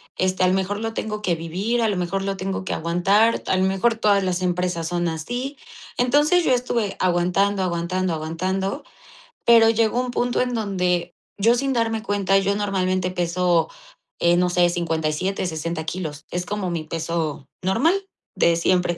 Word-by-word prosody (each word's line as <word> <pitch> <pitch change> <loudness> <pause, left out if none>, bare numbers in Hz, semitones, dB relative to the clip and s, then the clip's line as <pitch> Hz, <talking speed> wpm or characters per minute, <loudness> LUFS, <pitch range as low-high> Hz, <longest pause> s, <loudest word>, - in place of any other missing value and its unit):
este, 185 0 0
a - - +4
lo 180 - +2
mejor 190 +2 -1
lo 225 0 -3
tengo 210 -1 -4
que 180 -5 +1
vivir, 185 +9 -2
a 225 - +2
lo 200 - -1
mejor 180 +2 -1
lo 195 0 -2
tengo 190 0 -3
que - - -3
aguantar, 195 +7 +2
a 185 - +1
lo 185 - +2
mejor 195 +5 +1
todas 205 -3 +2
las 185 -1 -1
empresas 180 -2 -1
son 175 0 -1
así". 245 - -4 0.4
Entonces, 295 +8 +3
yo 260 - +4
estuve 240 -5 -1
aguantando, 185 +2 +2
aguantando, 180 0 -1
aguantando, 185 +5 -2 0.6
pero 230 -1 +7
llegó 225 +1 +2
un 250 -1 -3
punto 245 0 0
en 250 0 -1
donde 180 -5 -1 0.2
yo 230 +4 +4
sin 270 +2 -1
darme 225 -3 0
cuenta, 200 -3 +1
yo 200 +1 +1
normalmente 185 -3 0
peso, 175 -1 +1 0.5
eh, 170 0 +4
no 180 0 +2
sé, 175 0 +3
57, 170 +2 -1
60 160 -1 -3
kilos, 160 -4 -5
es 175 0 -3
como 205 -2 -3
mi 170 -2 -3
peso 160 -3 -3
normal 315 - +1 0.3
de 170 -1 +3
siempre. 180 0 +1
185 Hz, 175 wpm, -22 LUFS, 175-215 Hz, 0.6 s, pero